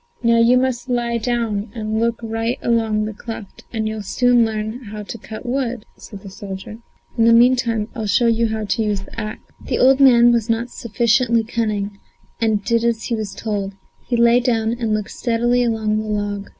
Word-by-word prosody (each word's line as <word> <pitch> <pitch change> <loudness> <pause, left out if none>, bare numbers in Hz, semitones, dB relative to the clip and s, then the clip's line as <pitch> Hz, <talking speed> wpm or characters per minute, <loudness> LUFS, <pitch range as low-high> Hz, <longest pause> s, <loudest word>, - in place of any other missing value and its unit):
"Now 230 0 +4
you 235 +2 +5
must 255 0 -1
lie 235 -1 0
down 225 -3 -1
and 220 -1 -2
look 230 0 0
right 225 +2 -2
along 220 -2 +1
the 215 - -5
cleft, 220 -1 -9
and 220 -2 -2
you'll 215 0 -4
soon 245 +3 +3
learn 220 +2 -3
how 210 0 -7
to 220 - -7
cut 215 +3 -9
wood," 245 -3 -2
said 200 -3 -11
the 195 - -8
soldier. 195 +2 -8 0.4
"In 225 - +5
the 230 - +6
meantime 235 -2 +3
I'll 220 -4 -4
show 240 +4 +3
you 230 0 +2
how 220 -1 -3
to 225 - -1
use 210 -3 0
the 195 - -9
axe." 215 0 -6 0.2
The - - -2
old 265 +1 +5
man 240 -3 +7
was 235 -1 0
not 230 +2 -1
sufficiently 235 +1 +1
cunning, 210 -3 -2 0.4
and 215 -3 0
did 230 +1 +1
as 235 -1 0
he 235 - -1
was 215 -3 -5
told; 200 -3 -3 0.3
he 240 - 0
lay 235 +1 +5
down 230 -3 0
and 235 -2 -2
looked 215 0 -2
steadily 240 +1 +1
along 220 -2 0
the 215 - -4
log. 205 -1 -3
225 Hz, 200 wpm, -20 LUFS, 215-235 Hz, 0.4 s, man